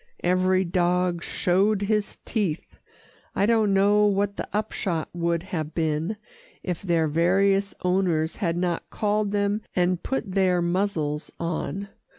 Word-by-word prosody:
Every 185 +1 +3
dog 180 0 +1
showed 195 +5 +1
his 210 0 0
teeth 195 -9 -3 0.6
I 200 - +2
don't 220 -2 +3
know 205 +2 +4
what 200 0 0
the - - -4
upshot 195 -6 -2
would 170 -1 -1
have 160 -5 -4
been, 160 +5 -1 0.5
if 180 -3 -3
their 170 -4 +1
various 195 +5 +2
owners 180 -3 +1
had 170 -5 -1
not 175 -1 -2
called 210 0 0
them 205 +1 0
and 180 -1 +1
put 245 -7 -3
their 185 -2 +2
muzzles 170 -4 -1
on. 180 +4 -3
185 Hz, 135 wpm, -25 LUFS, 170-200 Hz, 0.6 s, know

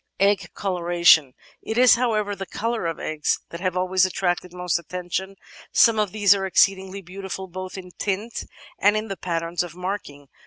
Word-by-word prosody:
Egg 195 -2 +2
Coloration 170 -7 +3 0.3
It 220 - -4
is, 250 0 +7
however, 215 -4 0
the 195 -1 -6
colour 230 -4 -2
of 165 - -4
eggs 155 -1 -1
that 170 - -7
have 185 -1 -1
always 185 0 +2
attracted 180 -1 -1
most 180 -1 -1
attention; 180 +3 -5 0.4
some 230 -2 +5
of 210 -3 0
these 205 -2 +5
are 195 -1 -2
exceedingly 190 0 +2
beautiful 190 +1 -6
both 185 +1 -7
in 180 -1 -9
tint 210 +3 -3 0.3
and 205 +2 +4
in 215 0 -4
the 195 - -3
patterns 170 -1 -2
of 175 -2 -6
marking. 180 -7 -5
190 Hz, 170 wpm, -23 LUFS, 175-200 Hz, 0.4 s, is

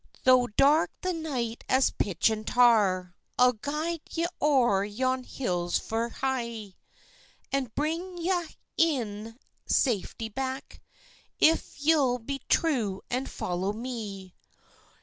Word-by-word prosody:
"Tho' 255 -1 +5
dark 280 +8 +4
the 370 -1 -1
night 260 -8 -3
as 260 +1 +4
pitch 195 +3 +1
and 215 0 -4
tar, 205 -7 +4 0.2
I'll 250 0 +5
guide 300 +7 -3
ye 335 0 -1 0.2
o'er 245 -10 +3
yon 255 +5 -1
hills 180 -10 -1
fu' 230 +1 -2
hie; 235 -6 -3 0.8
And 265 -5 -2
bring 335 +5 -2
ye 345 +2 -1
a' 350 -3 0 0.3
in 225 -8 0 0.3
safety 225 -2 0
back, 265 +4 -5 0.6
If 320 -2 +3
ye'll 285 -5 +3
be 275 +4 -5
true 230 - +1
and 255 +2 -1
follow 185 +3 -2
me." 210 -6 -6
250 Hz, 120 wpm, -28 LUFS, 215-285 Hz, 0.8 s, Tho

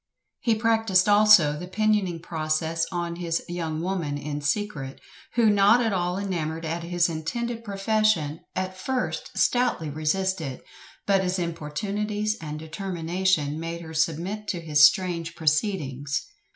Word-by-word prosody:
He 230 -3 +2
practised 220 -4 +3
also 205 -7 +6
the 180 - -6
pinioning 205 -4 +1
process 160 0 -1
on 170 -1 -3
his 170 -2 -2
"young 165 -2 -3
woman" 170 -6 -2
in 145 0 -4
secret; 145 -4 -2 0.4
who, 235 -2 +4
not 205 +3 +5
at 225 -4 +1
all 180 0 0
enamoured 165 -5 -3
at 165 +2 -2
his 175 0 +1
intended 230 +9 -3
profession, 200 -6 +1 0.2
at 185 0 -2
first 255 +7 -3
stoutly 245 - +1
resisted, 155 -1 -1 0.4
but 195 -1 +3
his 180 0 0
importunities 200 +6 -2
and 150 -1 -5
determination 165 -2 -1
made 165 +1 -5
her 160 -1 -9
submit 170 +7 -1
to 175 - -2
his 150 -3 +3
strange 170 -1 +3
proceedings. 150 -4 -1
175 Hz, 135 wpm, -25 LUFS, 160-205 Hz, 0.4 s, also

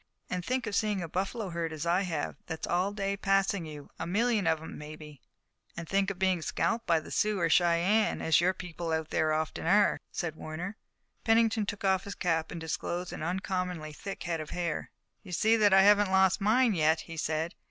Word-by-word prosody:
And 180 -1 -2
think 255 +4 -1
of 205 - -3
seeing 210 -4 0
a - - -4
buffalo 195 +5 -3
herd, 165 -1 -2
as 155 0 -5
I 175 +3 +2
have, 165 -6 -3
that's 160 -1 -4
all 180 +3 0
day 200 -1 -2
passing 195 -3 +1
you, 150 -2 -10
a - - -3
million 215 0 +1
of 160 -1 +2
'em, 160 - -9
maybe!" 150 -2 -10 0.6
"And 165 - -6
think 195 +2 +1
of 195 - -5
being 185 -2 +1
scalped 170 +9 -1
by 165 -1 +4
the 155 - -11
Sioux 210 -2 +1
or 165 -1 +2
Cheyennes, 175 +6 +3
as 160 +1 +3
your 180 +2 +3
people 170 -2 -5
out 160 -1 -2
there 155 0 +1
often 155 +1 -2
are," 205 +3 +4
said 165 -3 -3
Warner. 170 +6 -6 0.5
Pennington 225 -2 +3
took 205 -1 -4
off 190 -1 +2
his 200 - -6
cap 165 -2 0
and 170 - -6
disclosed 175 +2 -3
an - - -6
uncommonly 180 -2 -3
thick 195 +6 -7
head 165 -2 -2
of 155 - -8
hair. 170 -3 -3 0.3
"You 185 -3 -10
see 220 +6 +3
that 210 -2 +4
I 190 0 +7
haven't 205 0 +5
lost 190 0 +3
mine 225 +3 +4
yet," 160 -2 +2
he 165 - -9
said. 160 +2 -2
180 Hz, 210 wpm, -30 LUFS, 160-200 Hz, 0.6 s, I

